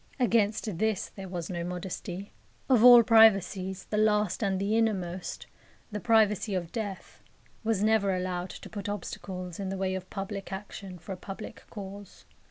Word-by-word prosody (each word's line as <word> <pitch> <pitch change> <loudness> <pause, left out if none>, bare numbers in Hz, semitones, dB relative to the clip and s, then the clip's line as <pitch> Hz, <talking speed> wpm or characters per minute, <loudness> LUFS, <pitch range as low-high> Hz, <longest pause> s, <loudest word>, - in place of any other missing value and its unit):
Against 215 -5 +1
this 220 -3 0
there 195 -1 -9
was 175 -1 -4
no 170 -1 -3
modesty. 180 +2 -5 0.4
Of 250 -4 +4
all 245 -1 +10
privacies, 195 -4 +4
the 210 - -1
last 210 -2 +2
and 195 -3 +1
the 200 +3 0
innermost 190 -6 -1 0.5
the 210 - -3
privacy 215 -3 +3
of 175 -2 -3
death 205 -4 -6 0.4
was 220 -3 +1
never 210 -3 +3
allowed 180 0 -3
to - - -9
put 205 -1 -6
obstacles 185 -3 -6
in 195 -1 -3
the 195 - -3
way 190 0 -1
of 185 0 -5
public 195 0 -5
action 190 -1 -7
for 175 +3 -10
a 190 - -4
public 195 +3 -9
cause. 200 -1 -9
195 Hz, 165 wpm, -29 LUFS, 185-215 Hz, 0.5 s, all